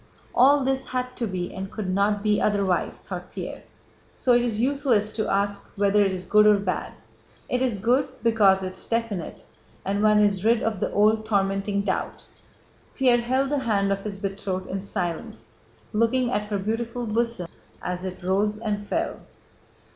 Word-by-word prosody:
"All 275 +3 +5
this 265 0 0
had 250 0 -3
to 235 - -1
be 180 -2 -4
and 190 +1 -5
could 215 -4 -4
not 200 +2 +1
be 210 -1 +2
otherwise," 200 -3 0
thought - - -7
Pierre, - - -6 0.5
"so 250 - +2
it 240 - +5
is 230 -3 -1
useless 250 -5 +1
to 215 -1 -1
ask 200 0 -1
whether 205 0 +3
it 195 - +1
is 185 -1 -3
good 210 +3 +5
or 210 -1 +6
bad. 190 -3 -3 0.5
It 250 - -1
is 250 -5 +1
good 250 +7 +2
because 205 -4 +4
it's 185 0 -4
definite 230 -7 -3 0.4
and 200 +1 0
one 210 0 +5
is 200 -2 +2
rid 230 +1 +3
of 220 -4 -1
the - - -1
old 215 +1 +3
tormenting 200 -1 0
doubt." 190 -2 -3 0.7
Pierre 250 -3 +4
held 260 +3 0
the 290 - +1
hand 205 -6 +1
of 195 0 -1
his 205 -2 -4
betrothed 195 -1 -3
in 195 - -2
silence, 175 - -4 0.4
looking 235 +3 +2
at 210 -3 -1
her 205 -1 -1
beautiful 230 +4 -3
bosom 230 -4 -1 0.4
as 180 0 -3
it 185 -1 -6
rose 205 +3 +1
and 210 -2 -2
fell. 205 - -2
210 Hz, 175 wpm, -25 LUFS, 195-235 Hz, 0.7 s, or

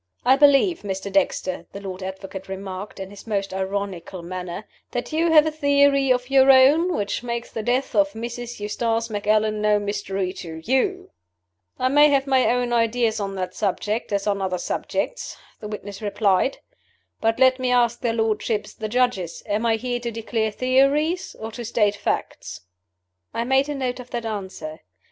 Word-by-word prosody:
"I 260 +2 +6
believe, 290 +5 +5
Mr. 195 0 -4
Dexter," 185 -1 0
the 200 - -6
Lord 190 -1 -7
Advocate 190 0 -7
remarked, 190 +1 -6
in 190 0 -6
his 205 +2 -13
most 200 -3 -2
ironical 190 -2 -4
manner, 180 +2 -6 0.2
"that 245 +4 -4
you 330 +1 +2
have 310 -1 +7
a 315 - 0
theory 280 -2 +3
of 250 +1 0
your 270 0 +6
own, 290 +7 +6
which 205 +2 -2
makes 235 -1 -4
the 225 - -4
death 250 +4 0
of 200 -2 +3
Mrs. 235 +1 -6
Eustace 225 +2 -1
Macallan 215 +1 +1
no 210 0 +3
mystery 195 -2 -2
to 160 -3 -8
you?" 370 - 0 0.7
"I 255 - +1
may 295 +2 +6
have 275 -1 +2
my 265 -2 +3
own 245 0 +1
ideas 230 -1 +1
on 195 -1 -3
that 185 -1 -3
subject, 210 +3 -2
as 200 -1 0
on 200 -1 0
other 185 -1 -1
subjects," - - -3 0.2
the 210 - -7
witness 205 -1 -7
replied. 205 +3 +1 0.6
"But 225 0 +1
let 260 0 +4
me 255 -1 0
ask 240 -1 +2
their 235 -2 0
lordships, 220 -1 -1
the 215 -1 -5
Judges: 240 -8 0
Am 215 +3 0
I 225 - +3
here 245 +1 -2
to 240 0 -3
declare 225 -1 -2
theories 275 - +1
or 220 0 -6
to 240 +2 -7
state 210 -3 +1
facts?" - - -3 0.7
I 230 - 0
made 265 +3 +2
a 295 - -2
note 255 -2 -2
of 250 0 -10
that 240 -2 -4
answer. 190 -7 -5
225 Hz, 175 wpm, -23 LUFS, 200-255 Hz, 0.7 s, have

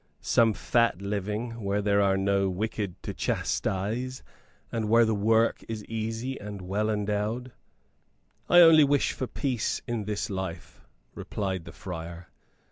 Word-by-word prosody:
"Some 115 -2 +3
fat 115 -6 +2
living, 105 +4 -3
where 100 +1 0
there 100 0 +2
are 95 -1 +3
no 100 0 +1
wicked 100 0 -3
to - - -4
chastise, 115 +7 -2 0.5
and 110 -2 -2
where 115 +1 +6
the 110 - +1
work 110 +2 +2
is 110 -2 -5
easy 115 +4 -4
and 105 -1 -7
well 100 +4 -1
endowed?" 105 +4 -2 1.0
"I 175 - +8
only 165 -2 +8
wish 145 0 +2
for 130 - -4
peace 125 -4 -2
in 115 -4 -2
this 105 0 -2
life," 95 -3 -6 0.3
replied 95 -4 -4
the 85 - -9
friar. 85 -1 -8
105 Hz, 140 wpm, -27 LUFS, 100-115 Hz, 1.0 s, I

